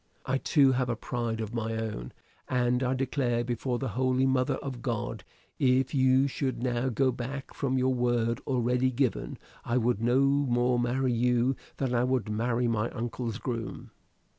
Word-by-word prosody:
I 135 Hz, +1 st, 0 dB
too 140 Hz, -2 st, +4 dB
have 125 Hz, -1 st, 0 dB
a 120 Hz, -, 0 dB
pride 115 Hz, -1 st, -3 dB
of 110 Hz, +1 st, -5 dB
my 115 Hz, -1 st, -2 dB
own: 105 Hz, -, -4 dB, 0.4 s
and 125 Hz, 0 st, +1 dB
I 130 Hz, 0 st, +1 dB
declare 125 Hz, -2 st, 0 dB
before 120 Hz, +1 st, -2 dB
the 135 Hz, +1 st, -3 dB
holy 130 Hz, +1 st, +1 dB
mother 130 Hz, +1 st, +2 dB
of 130 Hz, -3 st, -6 dB
God, 115 Hz, -, -3 dB, 0.4 s
if 130 Hz, +1 st, +2 dB
you 130 Hz, 0 st, +4 dB
should 130 Hz, -2 st, -2 dB
now 125 Hz, 0 st, 0 dB
go 130 Hz, +2 st, +2 dB
back 130 Hz, +3 st, -6 dB
from 130 Hz, -2 st, -1 dB
your 130 Hz, 0 st, +2 dB
word 120 Hz, -2 st, 0 dB
already 125 Hz, 0 st, +2 dB
given, 130 Hz, 0 st, -1 dB, 0.3 s
I 120 Hz, -, 0 dB
would 120 Hz, -3 st, +1 dB
no 120 Hz, +2 st, +3 dB
more 125 Hz, -3 st, +2 dB
marry 125 Hz, +1 st, +1 dB
you 125 Hz, +2 st, +2 dB, 0.2 s
than 130 Hz, -2 st, -1 dB
I 120 Hz, 0 st, +2 dB
would 125 Hz, -3 st, 0 dB
marry 115 Hz, +3 st, 0 dB
my 115 Hz, 0 st, 0 dB
uncle's 115 Hz, -1 st, -4 dB
groom." 115 Hz, -4 st, -5 dB
125 Hz, 170 wpm, -29 LUFS, 120-130 Hz, 0.4 s, too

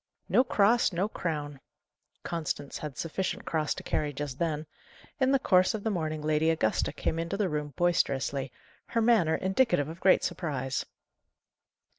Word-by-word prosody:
"No 250 Hz, -, +4 dB
cross, 235 Hz, -1 st, +3 dB
no 185 Hz, +3 st, 0 dB
crown!" 150 Hz, -8 st, -4 dB, 0.6 s
Constance 155 Hz, -4 st, -3 dB
had 150 Hz, -3 st, -6 dB
sufficient 180 Hz, +3 st, -3 dB
cross 155 Hz, -2 st, 0 dB
to -, -, -8 dB
carry 150 Hz, -1 st, -1 dB
just 140 Hz, -2 st, -5 dB
then. 155 Hz, -2 st, -1 dB, 0.5 s
In 265 Hz, -1 st, +3 dB
the 275 Hz, -, +5 dB
course 185 Hz, -5 st, +3 dB
of 210 Hz, -, -5 dB
the 220 Hz, -, 0 dB
morning 155 Hz, -4 st, -2 dB
Lady 155 Hz, +1 st, +2 dB
Augusta 135 Hz, -10 st, +1 dB
came 165 Hz, -, -2 dB
into 170 Hz, +4 st, -2 dB
the 200 Hz, -3 st, +1 dB
room 150 Hz, -1 st, -3 dB
boisterously, 140 Hz, -6 st, +1 dB, 0.4 s
her 230 Hz, -, 0 dB
manner 215 Hz, -9 st, +4 dB
indicative 190 Hz, -, +1 dB
of 165 Hz, +3 st, -8 dB
great 190 Hz, -, +4 dB
surprise. 140 Hz, -7 st, -2 dB
165 Hz, 155 wpm, -29 LUFS, 150-190 Hz, 0.6 s, the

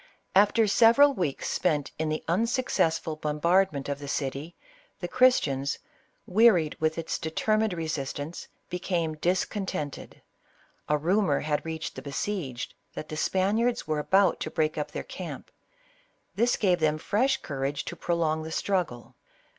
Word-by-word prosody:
After 210 Hz, +3 st, +5 dB
several 235 Hz, +7 st, +6 dB
weeks 175 Hz, -, -2 dB
spent 150 Hz, -6 st, 0 dB
in 160 Hz, -1 st, 0 dB
the 155 Hz, -, -2 dB
unsuccessful 175 Hz, -5 st, +1 dB
bombardment 155 Hz, +1 st, +1 dB
of 140 Hz, -1 st, -3 dB
the 145 Hz, -, -7 dB
city, 140 Hz, +3 st, -3 dB, 0.4 s
the -, -, -3 dB
Christians, 145 Hz, -, +2 dB, 0.5 s
wearied 185 Hz, -6 st, +4 dB
with 160 Hz, 0 st, 0 dB
its 165 Hz, -, -3 dB
determined 215 Hz, +6 st, 0 dB
resistance, 155 Hz, -1 st, -4 dB, 0.2 s
became 175 Hz, -3 st, -2 dB
discontented. 180 Hz, -3 st, -2 dB, 0.7 s
A 150 Hz, -, +3 dB
rumor 175 Hz, -1 st, +2 dB
had 150 Hz, -1 st, -1 dB
reached 160 Hz, -1 st, -5 dB
the -, -, -8 dB
besieged 140 Hz, -3 st, -4 dB, 0.2 s
that 155 Hz, -, -6 dB
the 155 Hz, -, -5 dB
Spaniards 210 Hz, +9 st, +1 dB
were 155 Hz, -1 st, 0 dB
about 190 Hz, +4 st, +3 dB
to -, -, -3 dB
break 155 Hz, -1 st, 0 dB
up 150 Hz, -, -3 dB
their -, -, -5 dB
camp; -, -, -8 dB, 0.8 s
this 240 Hz, +2 st, +2 dB
gave 180 Hz, -4 st, +2 dB
them 155 Hz, -1 st, +2 dB
fresh 255 Hz, -, +1 dB
courage 140 Hz, 0 st, -3 dB
to -, -, -5 dB
prolong 165 Hz, -2 st, 0 dB
the 160 Hz, +1 st, -6 dB
struggle. 175 Hz, -11 st, -2 dB
165 Hz, 140 wpm, -27 LUFS, 150-200 Hz, 0.8 s, several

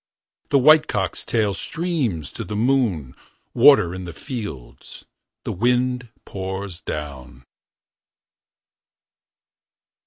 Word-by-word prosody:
The 140 Hz, -, +4 dB
white 155 Hz, +3 st, +6 dB
cock's 95 Hz, -5 st, -2 dB
tail 110 Hz, -4 st, 0 dB
Streams 130 Hz, -, -2 dB
to -, -, -6 dB
the 105 Hz, -, -6 dB
moon. 110 Hz, -, +1 dB, 0.4 s
Water 85 Hz, 0 st, +6 dB
in 95 Hz, 0 st, -6 dB
the 85 Hz, -, -7 dB
fields. 105 Hz, -, -8 dB, 0.4 s
The -, -, -3 dB
wind 125 Hz, +3 st, 0 dB, 0.2 s
pours 95 Hz, -2 st, -6 dB
down. 65 Hz, -5 st, -7 dB
100 Hz, 95 wpm, -22 LUFS, 85-125 Hz, 0.4 s, white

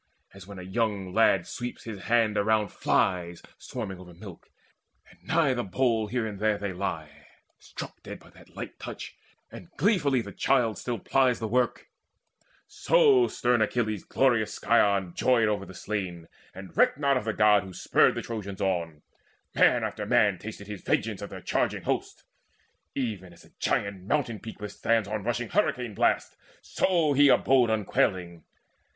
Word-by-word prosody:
As 95 Hz, -1 st, -13 dB
when 100 Hz, -1 st, -10 dB
a 90 Hz, -, -8 dB
young 100 Hz, -1 st, -2 dB
lad 100 Hz, -5 st, +3 dB
sweeps 120 Hz, 0 st, -6 dB
his 105 Hz, -4 st, -8 dB
hand 115 Hz, -2 st, +2 dB
around 105 Hz, 0 st, +2 dB
Flies 90 Hz, -2 st, 0 dB, 0.2 s
swarming 100 Hz, -7 st, -6 dB
over 90 Hz, -2 st, -13 dB
milk, 95 Hz, -1 st, -12 dB, 0.6 s
and -, -, -22 dB
nigh 160 Hz, -5 st, +2 dB
the 120 Hz, -1 st, -2 dB
bowl 110 Hz, +2 st, 0 dB
Here, 110 Hz, 0 st, -2 dB
there 105 Hz, +1 st, +1 dB
they 100 Hz, -2 st, -4 dB
lie, 80 Hz, -4 st, -5 dB, 0.3 s
struck -, -, -9 dB
dead -, -, -8 dB
by -, -, -19 dB
that -, -, -19 dB
light -, -, -8 dB
touch, -, -, -8 dB, 0.4 s
And 90 Hz, -, -11 dB
gleefully 145 Hz, -, +2 dB
the -, -, -9 dB
child 120 Hz, -5 st, +1 dB
still 120 Hz, -2 st, -3 dB
plies 130 Hz, +3 st, +2 dB
the 110 Hz, -, -4 dB
work; 125 Hz, +2 st, 0 dB, 0.8 s
So 425 Hz, -7 st, +4 dB
stern 120 Hz, -1 st, +1 dB
Achilles' 110 Hz, -2 st, -1 dB
glorious 120 Hz, -5 st, +1 dB
scion 100 Hz, -5 st, +2 dB
joyed 120 Hz, 0 st, +3 dB
Over 100 Hz, -2 st, -2 dB
the 95 Hz, -, -11 dB
slain, 90 Hz, -4 st, -4 dB, 0.3 s
and 95 Hz, -2 st, -10 dB
recked -, -, +3 dB
not 140 Hz, -1 st, +2 dB
of 125 Hz, -, -1 dB
the 110 Hz, -, 0 dB
God 105 Hz, -1 st, +4 dB
Who 95 Hz, -1 st, -10 dB
spurred -, -, +2 dB
the -, -, -4 dB
Trojans 100 Hz, -4 st, -6 dB
on: 85 Hz, -6 st, -2 dB, 0.5 s
man -, -, +4 dB
after -, -, -4 dB
man 100 Hz, -4 st, +3 dB
Tasted 105 Hz, -1 st, -8 dB
his 105 Hz, -2 st, -8 dB
vengeance -, -, -1 dB
of -, -, -6 dB
their -, -, -9 dB
charging -, -, -1 dB
host. -, -, -3 dB, 0.7 s
Even 105 Hz, -9 st, -4 dB
as 85 Hz, -, -18 dB
a -, -, -22 dB
giant 100 Hz, -2 st, -1 dB
mountain 120 Hz, -7 st, 0 dB
peak 110 Hz, -, -10 dB
withstands 110 Hz, +1 st, 0 dB
On 105 Hz, 0 st, -3 dB
rushing 120 Hz, +1 st, -2 dB
hurricane 125 Hz, -, 0 dB
blasts, -, -, +1 dB, 0.3 s
so 170 Hz, -6 st, +1 dB
he 145 Hz, +1 st, +5 dB
abode 130 Hz, -3 st, +4 dB
Unquailing. 90 Hz, -5 st, 0 dB
110 Hz, 165 wpm, -27 LUFS, 95-120 Hz, 0.8 s, he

